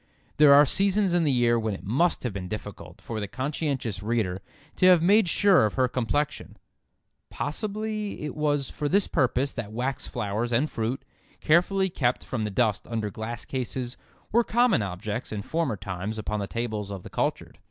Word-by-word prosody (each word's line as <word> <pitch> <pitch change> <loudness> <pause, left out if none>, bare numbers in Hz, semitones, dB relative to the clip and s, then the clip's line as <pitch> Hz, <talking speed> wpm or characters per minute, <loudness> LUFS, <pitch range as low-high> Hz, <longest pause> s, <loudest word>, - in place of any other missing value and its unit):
There 150 0 +7
are 145 +1 +8
seasons 195 +4 +2
in 175 -2 +3
the 145 - +3
year 120 -2 +3
when 110 -2 -2
it - - -11
must 145 - +1
have 125 -5 -2
been 95 -2 -5
difficult 95 -5 -8
for 115 -2 -5
the 105 - -3
conscientious 130 - -3
reader 105 -4 -1 0.4
to 185 - +5
have 180 -3 +6
made 200 +1 +5
sure 195 - +4
of - - -7
her 130 -1 +3
complexion. 130 +4 -2 0.7
Possibly 210 +4 -4
it 150 - -4
was 145 -3 0
for 145 -1 -3
this 200 +4 +3
purpose 135 +1 +1
that 110 -4 -5
wax 125 +4 -3
flowers 115 +1 -2
and 125 +6 +2
fruit, 115 +4 -3 0.3
carefully 190 +4 +2
kept 125 -6 0
from 120 - -4
the 105 - -1
dust 105 0 0
under 110 -3 -3
glass 110 +3 -6
cases, 125 -1 -4 0.4
were 235 +2 +4
common 235 - +3
objects 100 +4 -4
in 105 -2 -4
former 160 -7 -1
times 95 +2 -5
upon 105 0 -3
the 100 - -3
tables 110 -3 -3
of 100 -3 -6
the - - -10
cultured. - - -2
125 Hz, 185 wpm, -26 LUFS, 105-160 Hz, 0.7 s, are